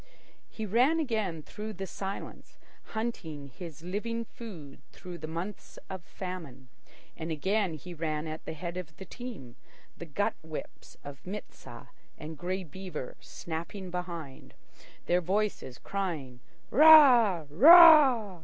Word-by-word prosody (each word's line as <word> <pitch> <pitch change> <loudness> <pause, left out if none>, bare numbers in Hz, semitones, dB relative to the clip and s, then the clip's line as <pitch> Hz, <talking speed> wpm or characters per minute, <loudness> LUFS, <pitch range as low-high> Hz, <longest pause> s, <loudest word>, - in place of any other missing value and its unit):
He 220 - -6
ran 250 - +3
again 215 - -2
through 215 +5 -7
the 195 0 -6
silence, 195 +1 -7 0.3
hunting 165 -11 -5
his 160 +3 -10
living 230 +6 -3
food 175 - -11
through 180 -1 -10
the 155 - -6
months 170 +6 -7
of 190 -2 -6
famine; 165 -10 -8 0.5
and 165 0 -6
again 190 +3 0
he 175 +4 -9
ran 155 -2 -3
at 155 0 -7
the - - -5
head 170 +2 -6
of 160 -4 -8
the 190 - -9
team, 210 - -9 0.4
the 170 - -9
gut 205 +8 -1
whips 160 -1 -9
of 140 -1 -10
Mit 205 +3 -7
sah - - -12 0.3
and 155 +1 -8
Grey 185 +5 -3
Beaver 170 -4 -8
snapping 175 +3 -7
behind, 170 -6 -7 0.5
their 180 +1 +2
voices 190 -8 -2
crying 160 -11 -4 0.3
"Ra! 250 - +7
Raa!" 265 - +8
180 Hz, 135 wpm, -29 LUFS, 160-215 Hz, 0.5 s, Raa